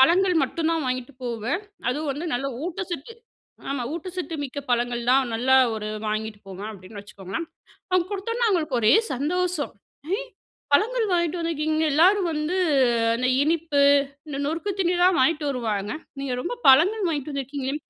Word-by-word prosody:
பழங்கள் 360 +6 +5
மட்டும்தான் 325 +2 0
வாங்கிட்டு 255 +2 -3
போவேன். 240 - -2 0.3
அதுவும் 295 +4 -2
வந்து 310 +5 -5
நல்ல 270 +3 -1 0.2
ஊட்டச்சத்து 360 0 -5 0.6
ஆமா 275 -3 -2
ஊட்டச்சத்து 355 0 -5
மிக்க 285 +1 -5
பழங்கள் 240 0 0
தான் 260 -1 +4
நல்லா 260 +3 +3 0.2
ஒரு 215 -1 -4 0.2
வாங்கிட்டு 215 0 -3
போவேன் 195 +2 -7
அப்டின்னு 200 +1 -10
வச்சுக்கோங்களேன். 200 - -6 0.4
அவங்க 365 -1 +2
குடுத்தோனே 460 +5 -2
அவங்களுக்கு 315 - +1
ஒரே 215 - +5 0.2
சந்தோஷம். 340 +3 -1 0.4
''ஏ - - 0 0.5
பழங்கள் 450 +8 +3
வாங்கிகிட்டு 345 0 +1
வந்துக்கிங்க. 315 -1 0
எல்லாரும் 370 +3 +4
வந்து 305 +4 -1 0.6
அந்த 250 +2 0
இனிப்பு 315 -2 +1 0.5
இந்த 290 -2 -5
நொறுக்கு 330 +6 -2
தீனி 355 0 +2
தான் 365 -4 +4
வாங்கிட்டு 300 +1 +2
வருவாங்க. 215 -5 -2 0.3
நீங்க 270 -2 -3
ரொம்ப 485 - -3
பழங்கள் 360 +8 +5
வாங்கி 295 -1 -3
வந்துருக்கீங்களே 275 0 -3
300 Hz, 145 wpm, -24 LUFS, 250-350 Hz, 0.6 s, பழங்கள்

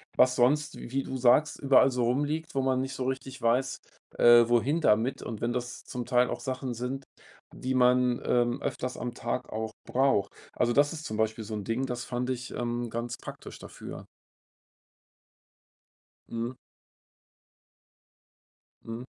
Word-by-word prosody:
Was 125 0 +5
sonst, 140 +5 +2
wie 135 +3 -3
du 130 - -5
sagst, 130 +5 +4
überall 135 -1 +5
so 125 -2 -1
rumliegt, 145 +6 -1
wo 135 - +1
man 130 -1 +1
nicht 135 +1 -3
so 130 -1 -3
richtig 130 0 -4
weiß, 125 +3 +1 0.4
äh, 120 -1 +8
wohin 120 +7 +2
damit 115 -1 +2
und 110 -3 -6
wenn 120 - 0
das 120 0 -4
zum 125 -1 -5
Teil 125 +1 +3
auch - - -3
Sachen 130 -2 -3
sind, 130 +3 -4 0.5
die 130 +1 -3
man, 125 -1 +3
ähm, 120 0 +1
öfters 125 0 -3
am 120 0 -4
Tag 120 +2 -3
auch 110 0 -4
braucht. 125 -7 +2 0.2
Also, 120 - +2
das 145 +5 +3
ist 160 -1 -7
zum 110 -7 -4
Beispiel 110 0 0
so 110 +1 -7
'n 105 - -4
Ding, 115 +4 -1
das 125 -2 -4
fand 125 0 -3
ich, 125 -1 -4
ähm, 120 0 -2
ganz 120 +2 -4
praktisch - - -10
dafür. - - -9 2.3
Mhm. 115 +2 -3 2.3
Mhm. 115 +2 -6
125 Hz, 155 wpm, -28 LUFS, 120-130 Hz, 2.3 s, äh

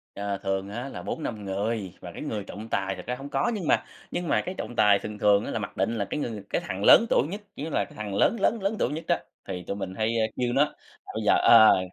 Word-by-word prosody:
Ờ, 100 -1 -2
thường 95 0 -1
á 120 +6 -5
là - - -7
4-5 110 -10 -4
người, 100 0 -2
và 90 - -8
cái - - -9
người 110 -9 -3
trọng 105 +3 -8
tài 95 -2 -1
thật - - -9
ra 125 - -2
hông 135 +2 -8
có 135 +8 +1
nhưng 190 -7 -3
mà - - +3 0.3
nhưng 175 - -3
mà - - +2
cái 185 +1 -4
trọng 120 - -5
tài 105 -3 +5
thường 105 +1 -6
thường 105 0 +4
á - - -4
là - - -2
mặc 105 - -6
định 105 +5 0
là 100 - -1
cái 150 - -4
người 110 -7 -4
cái - - 0
thằng 95 +2 -4
lớn 225 - +8
tuổi 135 - +3
nhất, 200 +6 -6
kiểu 140 - -6
như 160 - -3
là, - - 0
cái - - -17
thằng 105 -2 -4
lớn 230 - +3
lớn 220 +3 +2
lớn 195 +3 0
tuổi - - +2
nhất 160 +2 -5
đó, 175 - +3 0.3
thì 90 -2 -5
tụi - - -2
mình 95 -2 -5
hay, 110 0 0
ơ, 110 - +3
kêu 125 -1 0
nó, 140 +2 +5
là - - -11 0.4
bây 110 - -3
giờ, - - +6
ờ 110 -3 +8
110 Hz, 290 wpm, -26 LUFS, 100-140 Hz, 0.4 s, lớn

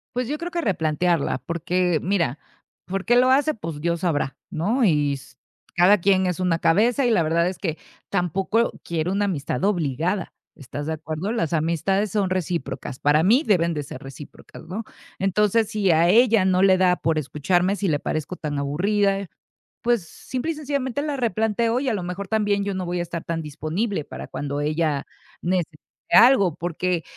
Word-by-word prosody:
Pues 250 -1 -1
yo 295 +3 -2
creo 345 +2 -5
que 345 - -2
replantearla, 170 - 0
porque, 170 +3 -1
mira, 170 -8 0 0.5
¿por 195 +1 -4
qué 240 - +4
lo 255 +1 +5
hace?, 290 +3 +3
pues 165 -7 -6
Dios 170 +1 -1
sabrá, 150 -6 -1
¿no?, 220 - 0
y 150 -7 +3
s 135 -2 -10 0.4
cada 185 +3 +6
quien 190 0 +3
es 180 0 -2
una 170 -2 +1
cabeza 235 +11 +3
y 240 - +3
la 170 -7 +3
verdad 170 +2 +2
es 185 - -4
que 165 -4 -3 0.3
tampoco 195 +5 0
quiero 170 +2 -2
una 205 +1 +1
amistad 165 -4 -2
obligada, 175 0 0 0.2
¿estás 145 +1 -7
de 160 - -1
acuerdo?, 160 +6 -4
las 200 -9 -1
amistades 170 +6 0
son 200 -3 0
recíprocas, 165 -7 -3
para 150 +2 +3
mí 240 - +4
deben 170 -4 +3
de 150 - -3
ser 135 -2 -9
recíprocas, 135 +2 -11
¿no?, 205 +6 -4 0.3
entonces, 210 +3 +2
si 210 -5 +1
a 165 +2 +4
ella 225 -1 +5
no 185 0 +2
le 190 -1 +5
da 180 -1 +3
por 160 -1 0
escucharme, 175 +7 0
si 200 - -1
le 145 -3 +1
parezco 155 +3 -3
tan 145 -4 -4
aburrida, 195 +7 0 0.6
pues, 235 -7 +1
simple 265 - -4
y - - -12
sencillamente 280 -2 -2
la 295 -2 -2
replanteo 225 +1 0
y 270 - -3
a 230 - 0
lo 200 - -2
mejor 180 +3 -5
también 205 -2 +1
yo 200 -1 -2
no 185 -1 -3
voy 175 0 -2
a 175 - -1
estar 170 -1 -6
tan 165 -1 -3
disponible 155 +6 -3
para - - -8
cuando 145 0 -4
ella 150 -1 0 0.4
necesite 175 -4 -1 0.3
algo, 220 - +6
porque 175 0 -2
180 Hz, 185 wpm, -23 LUFS, 160-210 Hz, 0.6 s, cada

